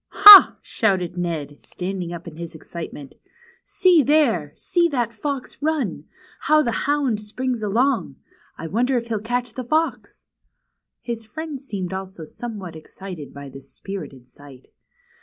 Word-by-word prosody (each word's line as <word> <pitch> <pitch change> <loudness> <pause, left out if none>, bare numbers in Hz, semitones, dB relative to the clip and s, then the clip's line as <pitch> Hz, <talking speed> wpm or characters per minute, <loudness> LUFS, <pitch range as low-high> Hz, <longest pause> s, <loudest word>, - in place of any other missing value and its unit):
^^Ha!" 405 0 +10
shouted 185 -5 -1
Ned, 160 -5 -4
standing 180 -1 -5
up 170 0 -8
in 160 - -9
his 170 -1 -8
excitement. 155 -4 -9 0.5
See 360 -4 +3
there! 255 - +2
See 345 -1 +1
that 240 -7 -2
fox 275 +4 -5
run! 275 - -2 0.3
How 305 0 +3
the 235 - -1 0.2
hound 275 -7 0
springs 245 +3 -4
along! 215 - 0 0.4
I - - -7
wonder 245 +9 0
if 235 0 -5
he'll 220 -2 -1
catch 245 +1 -3
the 255 - -5
fox! 310 +7 -2 0.4
" - - -53 0.3
His 235 -2 -5
friend 305 +3 -7
seemed 195 -9 -5
also 190 -3 -7
somewhat 200 -3 -8
excited 160 -1 -10
by 140 0 -10
this 135 0 -13
spirited 150 -10 -9
sight. 135 -1 -16
210 Hz, 145 wpm, -22 LUFS, 170-260 Hz, 0.5 s, ^^Ha